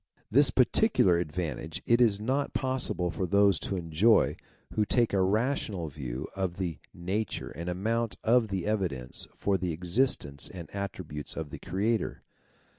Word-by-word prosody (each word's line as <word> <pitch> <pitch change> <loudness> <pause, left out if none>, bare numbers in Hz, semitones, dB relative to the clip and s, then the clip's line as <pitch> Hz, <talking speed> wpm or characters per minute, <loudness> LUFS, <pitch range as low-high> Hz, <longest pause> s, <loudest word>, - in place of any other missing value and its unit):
This 140 +5 +6
particular 125 - +4
advantage 80 -2 -4
it 120 +1 +4
is 105 -4 +4
not 135 +6 -1
possible 130 -9 -1
for 95 +1 -2
those 100 -2 +4
to 100 - -3
enjoy, 90 +6 +3 0.4
who 110 - +2
take 120 +1 +2
a 95 - +3
rational 105 - 0
view 65 -3 -5
of 95 -2 -2
the 90 -5 -3
nature 95 +4 -3
and 85 +2 -5
amount 110 +5 -1
of 115 0 +4
the 95 -4 -3
evidence 90 -13 -2
for 100 -2 +1
the 90 -1 -1
existence 85 - 0
and 85 -2 -9
attributes 90 -7 -5
of 80 -3 -5
the - - -7
Creator. 105 +4 -1
95 Hz, 150 wpm, -29 LUFS, 85-110 Hz, 0.4 s, This